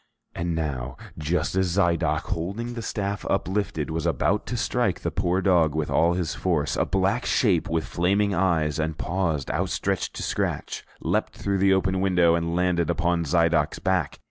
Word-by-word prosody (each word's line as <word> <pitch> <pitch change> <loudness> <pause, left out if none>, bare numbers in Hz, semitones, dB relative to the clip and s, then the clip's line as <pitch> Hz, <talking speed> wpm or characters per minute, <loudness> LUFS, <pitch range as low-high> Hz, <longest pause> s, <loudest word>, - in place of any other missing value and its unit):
And 85 0 -2
now, 65 -5 -3 0.2
just 80 +4 -1
as 95 -1 +1
Zidoc, 85 -4 +2
holding 100 +8 -4
the 120 - -5
staff 100 -2 -3
uplifted, 85 -5 -1
was 80 +1 -1
about 80 -6 0
to - - -2
strike - - 0
the - - -2
poor 90 +2 0
dog 85 -6 +3
with 80 -1 -1
all 85 +1 +3
his 85 -2 -2
force, 80 -6 0
a - - +1
black 95 +5 +1
shape, 95 -9 +2
with 80 -1 0
flaming 100 +4 +1
eyes 80 -6 +1
and 80 0 -2
paws 85 -7 -1
outstretched - - -1
to - - -4
scratch, - - -2 0.2
leaped - - 0
through 100 -1 -1
the 95 0 +4
open 95 0 0
window 90 -3 +4
and 85 0 0
landed 90 -2 +1
upon 85 -1 +1
Zidoc's 80 0 +2
back. 95 -5 0
85 Hz, 170 wpm, -25 LUFS, 80-95 Hz, 0.2 s, the